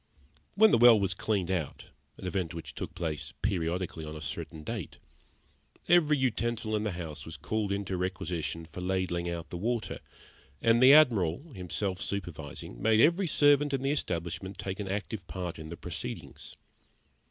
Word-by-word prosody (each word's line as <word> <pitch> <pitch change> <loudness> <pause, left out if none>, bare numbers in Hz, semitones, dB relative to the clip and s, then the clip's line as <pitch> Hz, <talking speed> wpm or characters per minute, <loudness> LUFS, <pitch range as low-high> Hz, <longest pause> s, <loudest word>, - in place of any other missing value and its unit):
When 220 +1 +7
the - - +5
well 120 -2 +8
was 95 -1 +1
cleaned 95 -1 -1
out, 85 -6 -3 0.3
an - - -9
event 90 -3 -2
which 85 - -7
took - - -6
place 75 -4 -4
periodically 90 -4 -1
on 75 0 -6
a - - -6
certain 75 +1 -6
date, 110 -4 -5 0.9
every 155 -4 +5
utensil 120 -3 0
in 105 - 0
the 105 -3 -2
house 80 -4 -6
was - - -8
called 110 -2 -2
into 100 -1 -2
requisition 85 -3 -3
for 80 +3 -8
ladling 90 -2 -1
out 85 -1 -5
the 85 - -4
water, 115 +3 -2 0.6
and 115 - +4
the 130 +1 +9
Admiral, 130 - +4
himself 95 0 -3
supervising, 80 -10 -5
made 110 -1 +4
every 170 - +4
servant 145 -1 +4
in 135 - -3
the 135 - +2
establishment 95 - -3
take 95 0 -4
an 100 - -3
active 105 +3 -4
part 90 -3 -5
in 80 0 -8
the 85 - -7
proceedings. - - -7
95 Hz, 165 wpm, -30 LUFS, 85-115 Hz, 0.9 s, the